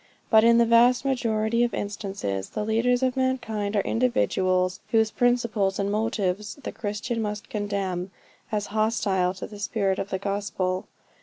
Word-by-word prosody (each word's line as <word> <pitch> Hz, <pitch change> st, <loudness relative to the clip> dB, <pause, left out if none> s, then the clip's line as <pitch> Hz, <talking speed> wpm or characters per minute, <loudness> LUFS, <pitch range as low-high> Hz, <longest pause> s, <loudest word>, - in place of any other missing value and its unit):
But 220 Hz, -1 st, +7 dB
in 235 Hz, 0 st, +6 dB
the 235 Hz, -, +5 dB
vast 240 Hz, +3 st, +4 dB
majority 230 Hz, -3 st, +1 dB
of 240 Hz, -, 0 dB
instances, 195 Hz, -, -4 dB
the 210 Hz, -, -3 dB
leaders 245 Hz, +3 st, +2 dB
of 255 Hz, 0 st, +1 dB
mankind, 230 Hz, -6 st, -1 dB
are 200 Hz, -, +3 dB
individuals 185 Hz, -7 st, +1 dB
whose 220 Hz, -1 st, +3 dB
principles 235 Hz, -6 st, +1 dB
and 200 Hz, 0 st, -1 dB
motives 210 Hz, -1 st, -1 dB
the 280 Hz, -, -7 dB
Christian 220 Hz, +2 st, -3 dB
must 210 Hz, -1 st, -4 dB
condemn, 200 Hz, -3 st, -2 dB, 0.4 s
as 210 Hz, -1 st, -1 dB
hostile 200 Hz, -4 st, +1 dB
to -, -, -6 dB
the 210 Hz, -1 st, -10 dB
spirit 200 Hz, -2 st, 0 dB
of 195 Hz, -, -3 dB
the 190 Hz, -, -1 dB
gospel. 195 Hz, -2 st, -2 dB
215 Hz, 155 wpm, -25 LUFS, 195-235 Hz, 0.4 s, But